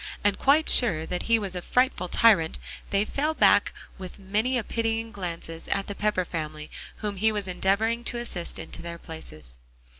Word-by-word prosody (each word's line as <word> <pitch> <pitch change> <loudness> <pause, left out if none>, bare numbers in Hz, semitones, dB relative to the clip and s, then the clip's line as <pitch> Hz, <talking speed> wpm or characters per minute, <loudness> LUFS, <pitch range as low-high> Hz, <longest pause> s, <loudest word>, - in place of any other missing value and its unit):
And 205 -1 +2
quite 295 +3 +4
sure 175 -11 +6
that 180 +2 -3
he 230 - +5
was 200 -4 -4
a 180 - -3
frightful 250 -4 +1
tyrant, 190 -7 +4 0.3
they 200 +1 +2
fell 300 +7 -1
back - - +4 0.3
with 185 -1 -8
many 210 +6 0
a 235 - -1
pitying 225 0 -2
glance 180 -6 -5
at 165 +4 -3
the 200 - -5
Pepper 210 -3 0
family 155 -2 -5 0.2
whom 205 -2 -4
he 220 +3 +3
was 205 -2 -3
endeavoring 205 +6 0
to 240 - -1
assist 215 -8 -4
into - - -6
their 170 0 -6
places. 75 - -8
200 Hz, 180 wpm, -26 LUFS, 175-225 Hz, 0.3 s, sure